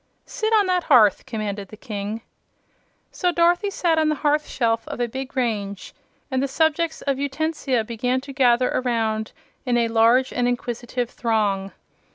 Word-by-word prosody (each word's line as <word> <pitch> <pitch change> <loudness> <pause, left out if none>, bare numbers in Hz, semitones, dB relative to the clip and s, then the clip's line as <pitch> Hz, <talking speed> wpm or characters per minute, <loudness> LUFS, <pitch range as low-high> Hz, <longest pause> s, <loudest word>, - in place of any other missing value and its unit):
"Sit 435 0 -2
on 425 -2 +5
that 365 -2 0
hearth," 225 -8 +5
commanded 205 -3 -4
the 215 - -12
King. 215 -1 -5 0.9
So 360 -1 0
Dorothy 345 +4 +2
sat 340 -4 +1
on 310 -1 +2
the 305 - +1
hearth 300 +1 +1
shelf 230 -2 0
of - - -5
the 240 0 0
big 265 +3 -7
range, 205 -5 -2 0.4
and 260 0 +1
the 275 - 0
subjects 320 +3 0
of 275 -2 -1
Utensia 285 -3 -1
began 245 +3 -1
to 275 +1 -9
gather 250 -2 +3
around 225 -3 -1 0.3
in 245 -2 +1
a 230 -1 +1
large 230 +3 +3
and 245 -1 +1
inquisitive 245 0 -3
throng. 205 -4 0
250 Hz, 165 wpm, -23 LUFS, 225-295 Hz, 0.9 s, on